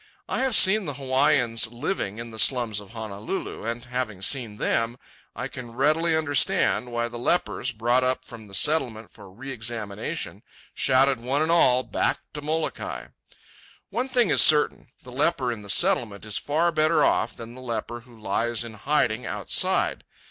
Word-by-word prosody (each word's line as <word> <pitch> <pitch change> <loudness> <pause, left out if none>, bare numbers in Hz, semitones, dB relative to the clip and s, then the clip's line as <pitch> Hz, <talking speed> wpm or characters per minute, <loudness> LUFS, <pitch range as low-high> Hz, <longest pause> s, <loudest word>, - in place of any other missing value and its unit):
I - - -2
have 260 -3 +1
seen 205 +1 +6
the 145 - -4
Hawaiians 130 -4 +2
living 120 - -3
in 115 0 -7
the 110 - -8
slums 115 -1 +2
of 100 -2 -12
Honolulu, 110 - -6
and, 115 +1 -4
having 125 -5 -4
seen 110 +1 +1
them, 115 +3 0 0.4
I 125 +3 -4
can 125 -3 -9
readily 155 +5 +2
understand 145 -4 +1
why 120 0 -1
the 120 0 -8
lepers, 135 -1 0
brought 120 +3 +1
up 130 0 -1
from 115 -3 -11
the 100 - -6
Settlement 115 - +1
for 100 - -11
re 125 +9 -9
examination, 110 -4 -5 0.3
shouted 135 0 +3
one 135 +5 0
and 160 - 0
all, 130 -7 +4
"Back - - 0 0.2
to 150 - -6
Molokai!" 155 +2 -3 0.8
One 250 +3 -2
thing 245 -4 +2
is - - +5
certain. 150 -1 +4 0.2
The 125 - -11
leper 130 -2 0
in 115 -3 -6
the 100 - -12
Settlement 115 - +2
is 105 -1 -1
far 165 +4 +1
better 155 +1 +3
off 115 - 0
than 115 0 -9
the 130 - -11
leper 120 -1 -4
who 120 -1 -18
lies 115 +3 0
in 115 -1 -8
hiding 125 0 0
outside. - - +1
125 Hz, 170 wpm, -25 LUFS, 115-145 Hz, 0.8 s, seen